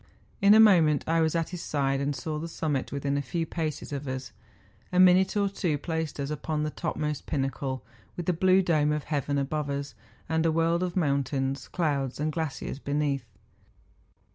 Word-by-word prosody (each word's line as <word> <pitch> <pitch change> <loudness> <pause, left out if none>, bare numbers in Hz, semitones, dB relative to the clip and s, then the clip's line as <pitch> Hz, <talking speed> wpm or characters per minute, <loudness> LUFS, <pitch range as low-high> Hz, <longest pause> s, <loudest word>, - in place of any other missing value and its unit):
In 200 +2 +7
a - - +7
moment 170 -9 +6
I 165 +1 +2
was 160 0 +1
at 165 -1 0
his 180 -3 -6
side, 135 -2 0
and 140 0 -1
saw 150 +3 -4
the 165 - -4
summit 150 -5 -2
within 140 0 -1
a - - 0
few 165 +5 -2
paces 155 -3 -4
of 140 0 -4
us. 130 0 -4 0.6
A 180 - +2
minute 185 +2 +5
or 200 -1 +3
two 180 -6 -1
placed 160 0 -3
us 140 +1 -2
upon 150 +1 -2
the 150 - -2
topmost 150 -1 -3
pinnacle, 135 -2 -2 0.3
with 175 - -4
the 180 - +2
blue 185 +3 +4
dome 155 -4 +2
of 150 -1 -1
heaven 145 -1 -1
above 145 +1 -1
us, 140 0 -3 0.3
and 160 0 +1
a 165 - +3
world 165 +2 +2
of 180 -1 -2
mountains, 140 -3 0
clouds, 140 -7 -1
and 155 +1 0
glaciers 155 -3 -4
beneath. 140 -3 -1
150 Hz, 190 wpm, -28 LUFS, 140-165 Hz, 0.6 s, In